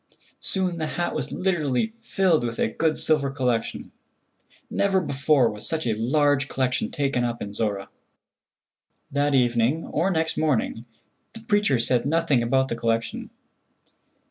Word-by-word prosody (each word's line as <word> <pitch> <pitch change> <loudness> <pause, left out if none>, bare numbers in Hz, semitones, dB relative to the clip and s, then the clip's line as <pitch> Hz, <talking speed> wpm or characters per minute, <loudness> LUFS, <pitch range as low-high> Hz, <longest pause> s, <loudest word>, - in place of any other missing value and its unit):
Soon 185 -3 -1
the 155 -1 -2
hat 175 0 -1
was - - -3
literally 160 - 0
filled 195 - 0
with 115 -1 -3
a - - +2
good 155 +7 0
silver(?) 150 -3 +1
collection. 125 -4 -2 0.8
Never 195 -1 +1
before 140 -5 +2
was 105 -1 -5
such 160 -1 -2
a 115 - +1
large 140 +5 +2
collection 130 - -1
taken 140 - 0
up 120 -1 -2
in 100 -1 -6
Zorra. 100 -2 -2 1.2
That 145 0 +1
evening 120 +4 +2
or 170 +5 0
next 160 -3 0
morning 130 -6 0 0.5
the 225 - -10
preacher 205 - +2
said 120 +3 +1
nothing 160 -4 +2
about 130 +3 +1
the - - -1
collection. 115 -1 -2
140 Hz, 145 wpm, -24 LUFS, 120-165 Hz, 1.2 s, a